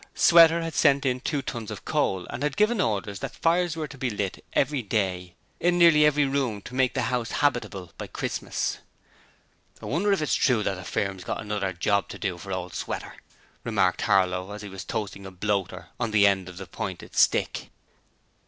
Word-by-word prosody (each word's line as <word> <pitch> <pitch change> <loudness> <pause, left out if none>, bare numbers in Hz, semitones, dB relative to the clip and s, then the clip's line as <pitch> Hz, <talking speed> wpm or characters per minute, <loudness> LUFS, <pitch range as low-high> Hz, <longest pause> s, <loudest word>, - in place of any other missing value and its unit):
Sweater 170 0 +6
had 165 -1 -4
sent 140 0 +3
in 125 -1 +1
two 140 +1 -2
tons 115 -4 -5
of 105 -3 -8
coal 95 -2 0
and 120 - -5
had 145 -1 -1
given 215 0 +3
orders 100 - -1
that - - -6
fires 170 0 +1
were 155 -1 -3
to 140 - -12
be 130 - 0
lit 100 -3 -4
every 140 0 +1
day 95 -5 -2 0.2
in 175 0 +2
nearly 160 -3 +6
every 150 -1 +3
room 135 -6 -1
to - - -10
make 130 -1 +1
the - - 0
house 120 -2 -1
habitable 115 - -1
by - - -5
Christmas. - - -3 1.0
'I - - -10
wonder 180 +9 +1
if 195 - +2
it's 150 - 0
true 120 -5 +3
as - - -4
the 95 -2 -2
firm's 95 0 -2
got - - -3
another 105 -2 -2
job 100 +3 0
to - - -7
do 90 -4 -3
for 95 +3 -8
old 90 -1 -4
Sweater?' - - -5 0.5
remarked 100 -5 +1
Harlow 95 0 +1
as 105 0 -8
he 105 - -7
was 95 -1 -7
toasting 100 -2 -5
a - - -7
bloater 95 -1 -2
on 115 -2 0
the 105 -2 +4
end 95 -2 +2
of 90 - -11
the 95 - -7
pointed 85 - -6
stick. - - +2
105 Hz, 200 wpm, -26 LUFS, 95-140 Hz, 1.0 s, Sweater